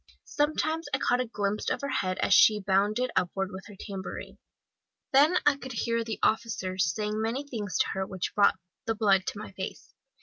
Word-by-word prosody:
Sometimes 315 +2 0
I - - 0
caught 250 -2 +1
a 250 - -3
glimpse 205 -1 -2
of - - -2
her 280 - -3
head 185 -7 -1
as - - +3
she 215 -1 +7
bounded 205 +5 +1
upward 190 +1 0
with 190 +1 -9
her 205 - -12
tambourine. 195 -3 -7 0.7
Then 300 +6 +6
I 295 -1 +4
could 260 -2 -8
hear 230 0 0
the 225 -1 -4
officers 190 -6 +1
saying 210 +4 -2
many 245 +6 -2
things 210 -7 -3
to - - +2
her 190 0 -2
which 190 -2 -4
brought 200 -2 +4 0.3
the 225 - +1
blood 195 -3 +3
to - - -3
my 215 - -7
face. 190 0 -7
210 Hz, 195 wpm, -28 LUFS, 195-250 Hz, 0.7 s, she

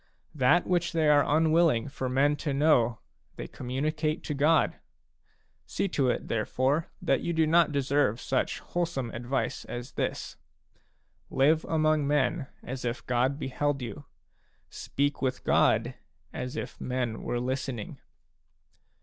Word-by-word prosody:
That 150 +4 +3
which 175 -1 0
they 160 -2 +2
are 145 -1 +6
unwilling 155 -5 +3
for 130 -2 -4
men 140 +3 +3
to 145 -1 -2
know, 125 -6 +3 0.4
they - - -6
communicate 150 +5 -2
to 150 - -3
God. 150 +3 +3 0.9
See - - -1
to 135 -7 +1
it, - - -2
there 110 -2 -1
fore, 140 +6 +1 0.2
that - - +2
you 170 - -2
do 160 -1 +3
not 165 0 +4
deserve 140 -4 +1
such 130 0 -1
wholesome 165 -9 -3
advice 125 +4 -2
as 120 +2 -6
this: - - -3 0.5
" - - -43 0.2
Live 155 +4 +3
among 155 -2 +2
men 145 +1 +1 0.2
as 130 +1 -6
if 120 0 -3
God 125 +3 +1
beheld 140 0 -2
you; 140 +5 -7 0.7
speak 145 +1 -2
with 130 -1 -1
God - - +3 0.4
as 125 +3 -5
if - - -6
men 125 -3 -2
were 120 - -2
listening." 130 -2 -4
140 Hz, 140 wpm, -28 LUFS, 125-155 Hz, 0.9 s, are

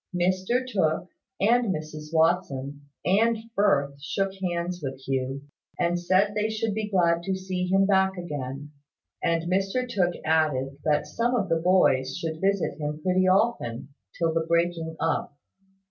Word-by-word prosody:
Mr 185 +8 +1
Tooke, 180 -6 0 0.3
and 235 +1 +3
Mrs 155 -2 -6
Watson, 145 -4 +1 0.2
and 225 +5 +3 0.2
Firth 140 -9 +2
shook 195 +6 -1
hands 175 -1 -2
with 135 -2 -5
Hugh, 135 +1 -2 0.4
and 175 0 +1
said 190 +4 +2
they 210 +1 0
should 220 -1 -1
be 215 0 -3
glad 170 -3 +2
to 190 +2 -2
see 185 -1 -3
him 195 +1 +3
back 190 -1 +2
again: 145 -4 -5 0.5
and 165 -1 +1
Mr 195 +8 0
Tooke 180 -7 0
added 150 -4 +1
that 150 -1 +2
some 240 +2 0
of 200 -6 0
the 165 0 +2
boys 135 -8 +3
should 160 -2 -4
visit 195 -4 0
him 150 0 -3
pretty 185 0 +2
often 185 - +1 0.3
till 165 -1 +1
the 165 0 +1
breaking 170 -1 0
up. 155 -3 -1
175 Hz, 150 wpm, -26 LUFS, 155-195 Hz, 0.5 s, and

